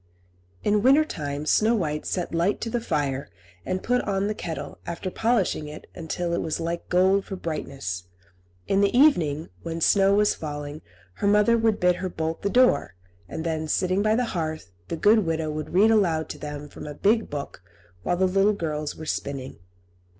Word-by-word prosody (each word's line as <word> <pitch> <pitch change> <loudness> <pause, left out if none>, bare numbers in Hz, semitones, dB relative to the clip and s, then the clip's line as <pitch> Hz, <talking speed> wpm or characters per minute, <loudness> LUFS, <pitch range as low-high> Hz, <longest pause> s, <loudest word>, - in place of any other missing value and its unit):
In 210 0 +2
winter 275 +6 +5
time 145 - -4
Snow 220 +8 +3
White 150 -7 -2
set 180 -2 -2
light 170 +5 +1
to 230 - -3
the 240 - -1
fire, 140 - -1 0.3
and 185 - -3
put 250 +1 +2
on 195 -1 -1
the 210 - 0
kettle, 165 -6 -6
after 170 +2 -4
polishing 220 -10 +1
it 150 +1 -9
until 170 +1 -3
it - - 0
was 160 0 -2
like 170 +1 -4
gold 190 +2 +3
for 195 - -5
brightness. 135 - -4 0.6
In 195 0 +2
the 200 +4 +2
evening, 165 - +3
when 165 0 -4
snow 195 +3 +4
was 210 0 +3
falling, 145 -1 -6 0.4
her 200 - 0
mother 210 +3 +5
would 225 -2 +2
bid 180 0 +3
her 185 - -3
bolt 160 -1 -3
the 200 - 0
door, 200 - +3 0.3
and 160 - -4
then, 160 -1 -2
sitting 185 +4 +1
by 215 +1 +3
the 250 +1 +1
hearth, 155 - -3 0.2
the 165 - -3
good 215 +6 +5
widow 160 -4 -1
would 155 0 -5
read 205 +5 +5
aloud 170 -8 +2
to - - -7
them 150 0 -6
from 145 - -10
a 150 - -7
big 220 +7 +2
book 145 -1 -6 0.4
while 175 - 0
the 190 - +3
little 195 +3 +3
girls 155 -5 -3
were 160 - -8
spinning. 135 - -4
175 Hz, 190 wpm, -25 LUFS, 155-205 Hz, 0.6 s, winter